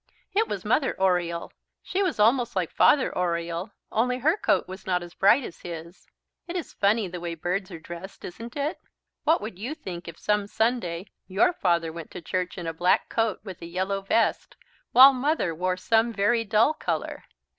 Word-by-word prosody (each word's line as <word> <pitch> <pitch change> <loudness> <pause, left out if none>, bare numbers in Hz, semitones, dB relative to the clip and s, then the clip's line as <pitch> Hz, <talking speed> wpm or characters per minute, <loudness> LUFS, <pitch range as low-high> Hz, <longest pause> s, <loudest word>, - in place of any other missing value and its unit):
It 440 +3 +2
was - - -4
Mother 270 - +1
Oriole. 175 -3 0 0.3
She 385 - -1
was 360 - 0
almost 235 +2 +3
like 180 -3 -1
Father 280 -3 +4
Oriole, 170 +1 -1 0.2
only 250 +3 +1
her 305 +7 +2
coat - - +1
was 190 +1 -9
not 180 -1 +1
as 175 0 -11
bright 220 +8 +4
as 170 - -8
his. 170 +1 -9 0.4
It 345 - -5
is 350 - -4
funny 205 +1 +2
the 180 0 -6
way 170 -1 -4
birds 180 +4 -2
are 170 -4 -8
dressed, 175 +4 -9
isn't 230 +6 -8
it? 290 +4 -2 0.5
What 320 +2 +4
would 210 -3 -7
you 250 +9 -4
think 175 - -8
if 165 0 -8
some 210 -1 0
Sunday 205 -6 -1 0.2
your 195 - +3
Father 170 - 0
went 165 -2 -8
to 180 - -7
church 180 +3 -2
in 175 - -5
a 165 - -2
black 175 +3 +2
coat 225 -3 0
with 190 -5 -9
a 170 - -7
yellow 190 +3 -2
vest, 225 +4 0 0.4
while 265 +2 +9
Mother 270 - 0
wore 180 +3 -1
some 225 +5 +2
very 230 +2 +2
dull 220 +8 +3
colour? 310 - -3
195 Hz, 190 wpm, -26 LUFS, 175-235 Hz, 0.5 s, while